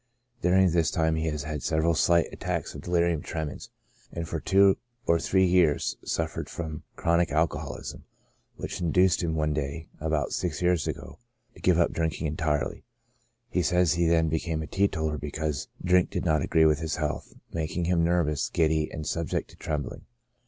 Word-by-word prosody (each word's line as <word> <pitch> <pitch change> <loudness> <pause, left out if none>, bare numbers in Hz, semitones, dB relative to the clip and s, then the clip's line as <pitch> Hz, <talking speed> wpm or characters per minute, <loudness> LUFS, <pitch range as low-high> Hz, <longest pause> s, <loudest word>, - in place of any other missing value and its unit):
During 95 0 +4
this 85 -1 +2
time 80 -1 +1
he 80 0 -1
had 75 -1 -3
several 80 +1 +1
slight 85 +1 +4
attacks - - -3
of - - -8
delirium 85 -3 +1
tremens, 80 -1 -5 0.4
and 85 -1 -4
for 80 - -3
two 95 +3 +4 0.3
or 85 0 +3
three 95 +2 +3
years 90 -5 +3
suf - - -2
fered - - -5
from 80 -2 -5
chronic 85 0 +2
alcoholism, 80 +2 -2 0.5
which - - -5
induced 90 +1 +3
him 80 -2 -1
one 75 -1 +1
day, 75 +2 -4
about 75 -3 -1
six - - -2
years 90 -4 +2
ago, - - -6 0.3
to - - -16
give 90 -3 +4
up 85 - +3
drinking 80 -1 -2
entirely. 75 -1 -1 0.7
He - - +1
says 90 -2 +3
he 85 0 +2
then 80 -1 +3
became 80 0 -1
a - - -5
teetotaller 80 -5 0
because 75 0 -3 0.2
drink 90 0 +4
did - - -3
not 80 -3 +2
agree 80 +3 +3
with 75 -1 +4
his 80 -1 -2
health, 75 -2 -3 0.2
making 80 +1 -2
him 85 -1 +2
nervous, 85 -4 +1
giddy, 80 -1 +1
and 80 -2 -5
subject 85 +1 -2
to - - -16
trembling. 75 -3 -4
80 Hz, 175 wpm, -27 LUFS, 75-85 Hz, 0.7 s, During